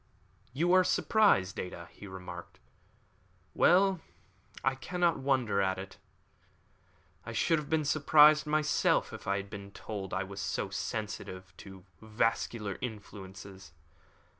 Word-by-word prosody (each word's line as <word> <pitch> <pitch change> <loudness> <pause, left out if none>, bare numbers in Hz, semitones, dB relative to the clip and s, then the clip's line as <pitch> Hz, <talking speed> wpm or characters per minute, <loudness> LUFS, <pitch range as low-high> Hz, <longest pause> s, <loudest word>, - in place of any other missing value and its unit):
"You 170 +8 +1
are 185 0 +6
surprised, 180 - +2
Ada," 85 -2 -6
he 105 - -12
remarked. 90 -2 -9 0.9
"Well, 190 0 +4 0.6
I 135 - +2
cannot 170 +4 0
wonder 130 -7 +1
at 95 -1 0
it. 95 0 -8 1.3
I - - -7
should 165 -2 +2
have 150 - -8
been 160 -1 +1
surprised 150 +1 +5
myself 155 0 +1
if - - -9
I 100 0 +1
had 100 +1 -6
been 100 -1 -8
told 100 -1 -6
that - - -4
I 95 - 0
was 100 +1 -7
so 95 +2 -2
sensitive 95 -2 -5
to 95 -2 -12 0.2
vascular 110 -1 -1
influences. 100 -5 -8
105 Hz, 130 wpm, -31 LUFS, 95-150 Hz, 1.3 s, are